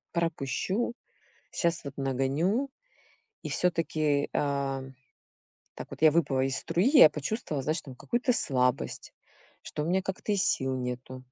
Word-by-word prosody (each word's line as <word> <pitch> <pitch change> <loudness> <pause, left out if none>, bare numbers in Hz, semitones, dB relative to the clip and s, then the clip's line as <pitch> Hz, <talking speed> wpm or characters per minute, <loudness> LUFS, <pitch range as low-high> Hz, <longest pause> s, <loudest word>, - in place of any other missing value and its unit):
пропущу, 170 - -1 0.6
щас 170 -2 0
вот 140 -1 -7
нагоню. 140 - 0 0.7
И - - -4
всё-таки, 155 -4 +1
а, 140 -2 -1 0.9
так - - -7
вот - - -9
я 155 -1 +7
выпала 145 -5 +2
из 135 0 0
струи, 170 +4 0
я 270 - +9
почувствовала, 150 - -3
знаешь, 155 +4 -1
там 130 -3 -11
какую-то 245 - 0
слабость, 125 - 0 0.5
что 150 - -5
у - - -3
меня 185 +2 +2
как-то 190 +2 -4
и - - +3
сил 130 -7 +1
нету. 130 0 -5
150 Hz, 140 wpm, -29 LUFS, 135-180 Hz, 0.9 s, я